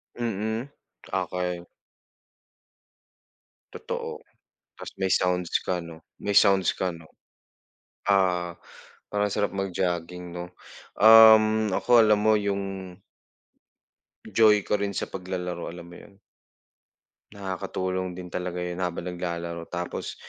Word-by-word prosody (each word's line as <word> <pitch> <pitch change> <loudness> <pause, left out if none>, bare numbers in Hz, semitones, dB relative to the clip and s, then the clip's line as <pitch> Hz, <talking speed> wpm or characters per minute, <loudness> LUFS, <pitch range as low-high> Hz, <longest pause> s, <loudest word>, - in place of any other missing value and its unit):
Mm, 115 +2 -3 0.4
okey. 90 -1 -2 2.1
Totoo, - - -6 0.5
ta's - - -9
may 95 -1 0
sounds 90 -1 +1
ka 90 - 0
'no? 80 -1 -11 0.2
May 100 - -2
sounds 95 -2 +5
ka, 95 - -2
'no? 85 -1 -11 1.0
Ah 90 -3 +2 0.6
parang 105 0 0
sarap 105 - 0
mag 95 -1 -2
jogging 90 0 -3
no 90 0 -7 0.5
um 110 -1 +8
ako 120 +2 +5
alam 105 -1 +4
mo 110 - +5
yung 95 -2 -4 1.3
joy 110 0 +5
ko - - -1
rin 100 -1 -2
sa - - -3
paglalaro, 90 -2 -4
alam 85 0 -9
mo 85 0 -13
yun? 100 -1 -16 1.2
Nakakatulong 95 -1 -3
din 90 -1 -9
talaga 90 -1 -3
yun 90 +1 -5
habang 90 -2 -2
naglalaro, 85 -1 -5
tapos 90 -1 -5
95 Hz, 110 wpm, -26 LUFS, 90-100 Hz, 2.1 s, um